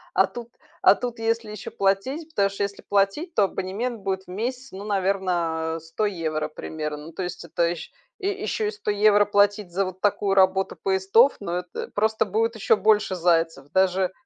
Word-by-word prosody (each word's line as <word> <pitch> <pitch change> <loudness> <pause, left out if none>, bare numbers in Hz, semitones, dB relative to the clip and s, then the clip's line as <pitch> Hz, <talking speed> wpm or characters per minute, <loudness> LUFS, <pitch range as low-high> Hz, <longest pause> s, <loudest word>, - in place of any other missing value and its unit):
А 190 - +5
тут 235 +4 -8 0.3
а - - +7
тут 245 -1 -5
если 225 -1 -1
ещё 210 -2 -7
платить, 225 +12 0
потому 200 -9 +2
что 200 +1 -4
если 200 0 -4
платить, 205 - 0
то 205 - +4
абонемент 210 +6 -3
будет 190 -1 -2
в - - -34
месяц, 245 +7 -4
ну, 195 +2 -8
наверно, 180 -5 0
100 165 +7 -2
евро 155 -5 -2
примерно. 150 -1 -6
Ну, 165 - -10
то 185 - -5
есть 180 - -6
это 170 +1 0
ещ 170 -1 -4 0.3
ещё 410 +2 -2
и - - 0
100 425 - -4
евро 205 0 +5
платить 205 -1 +2
за 195 +2 +1
вот 185 0 -7
такую 200 -1 +1
работу 190 0 +3
поездов, 195 +7 +3
ну, 195 -4 -4
это 180 0 -4
просто 220 +1 +2
будет 225 +4 0
ещё 215 - +3
больше 210 -1 +3
зайцев, 165 -5 +1
даже 190 0 +2
195 Hz, 185 wpm, -24 LUFS, 180-215 Hz, 0.3 s, а